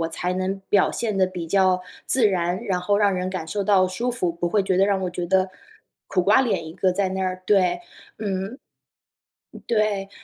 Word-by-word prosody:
我 165 - -1
才 180 +2 -3
能 190 +1 -2
表 200 -2 +3
现 220 -4 -2
得 190 -1 +3
比 180 -3 -6
较 185 0 +3 0.3
自 245 -4 +3
然， 180 -2 -1
然 185 -2 -1
后 200 +3 +1
让 200 -2 +3
人 185 0 -2
感 185 -4 -4
受 205 +4 -2
到 190 -2 +4
舒 235 +7 -2
服， 180 -8 -1
不 170 +1 -2
会 205 +2 +2
觉 185 -1 +1
得 195 - +5
让 200 -1 +1
我 180 - -2
觉 175 0 -4
得 185 +1 +2 0.6
苦 185 - +1
瓜 205 +8 +5
脸 190 -9 -1
一 160 - -8
个 185 +1 +1
在 190 0 0
那 190 0 -2
儿。 185 0 -3
对， 180 -4 +3 0.4
嗯。 200 +3 -3 1.1
对， 215 -3 0
190 Hz, 225 characters per minute, -23 LUFS, 180-200 Hz, 1.1 s, 得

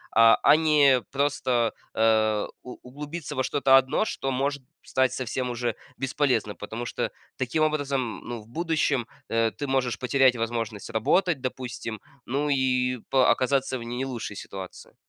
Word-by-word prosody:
а, 115 0 +8
а - - +7
не 150 -5 +4
просто, 130 -5 +1 0.2
э, 110 -1 +3 0.2
у 125 - -9
углубиться 150 +4 -7
во 130 - 0
что-то 135 0 +4
одно, 135 +10 +2
что 135 - -3
может 140 +2 -1 0.2
стать 130 -1 +1
совсем 130 0 -3
уже 120 -1 -2 0.2
бесполезным. 130 -6 0
Потому 115 +7 -6
что - - -3 0.3
таким 130 +5 0
образом, 140 -6 -1
ну, 120 -1 -4
в 105 - -18
будущем, 150 -3 0 0.2
э, 115 0 +2
ты 145 - -5
можешь 130 -5 0
потерять 130 0 +3
возможность 115 -3 -3
работать, 165 - +2
допустим, 125 -3 -5 0.3
ну, 140 +4 0
и 125 -2 +1
по 130 -1 +4
оказаться 130 0 +1
в - - -7
не 120 +3 -3
лучшей 120 -5 -5
ситуации. 95 -1 -9
130 Hz, 150 wpm, -26 LUFS, 115-140 Hz, 0.3 s, а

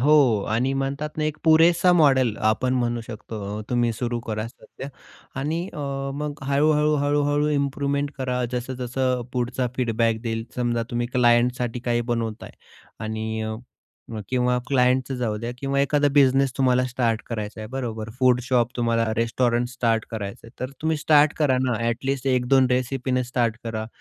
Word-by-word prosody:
हो 135 -6 +5
आणि 125 +5 +1
म्हणतात 140 +3 -3
ना, 155 - +1
एक 155 0 -2
पुरेसा 165 +3 +5
मॉडेल 135 -9 +4
आपण 125 +4 +1
म्हणू 120 -1 0
शकतो. 105 -2 -6
तुम्ही 120 -1 +2
सुरू 120 +1 -2
करा 110 -1 -4
सध्या 135 +2 -11 0.5
आणि 155 +4 -1
अ, 160 - -8 0.4
मग 150 0 -5
हळू-हळू, 150 +2 +3
हळू-हळू 145 +1 +1
इम्प्रुव्हमेंट 140 0 0
करा. 125 -1 -1
जसं-जसं 125 0 -2
पुढचा 125 0 -1
फीडबॅक 115 -2 +1
देईल. 115 -1 -3
समजा, 120 -1 0
तुम्ही 120 0 -1
क्लायंटसाठी 120 0 +2
काही 120 -1 0
बनवताय 115 -2 -3 0.5
आणि 110 0 -3
अ, 110 0 -3 0.7
किंवा 125 -1 +1
क्लायंटच 130 0 +2
जाऊ 115 -4 -1
द्या 115 +2 -4
किंवा 140 +1 0
एखादा 145 +1 +2
बिझनेस 135 -2 +4
तुम्हाला 130 -1 +3
स्टार्ट 120 -3 -1
करायचं 110 -1 -5
आहे, 110 - -6
बरोबर. 115 -4 -4
फूड 125 -1 +4
शॉप, 125 -1 0
तुम्हाला 115 -2 +1
रेस्टॉरंट 120 +1 +1
स्टार्ट 115 -3 0
करायचं 105 -1 -6
आहे, - - -12
तर 130 +1 -3
तुम्ही 160 0 +1
स्टार्ट 150 0 +4
करा 140 -5 +3
ना. 125 -2 +1
अ‍ॅट 115 +3 -2
लिस्ट 135 -1 -2
1-2 130 +1 +3
रेसिपीने 125 0 0
स्टार्ट 120 -2 0
करा. 110 -1 -4
125 Hz, 155 wpm, -24 LUFS, 115-135 Hz, 0.7 s, हो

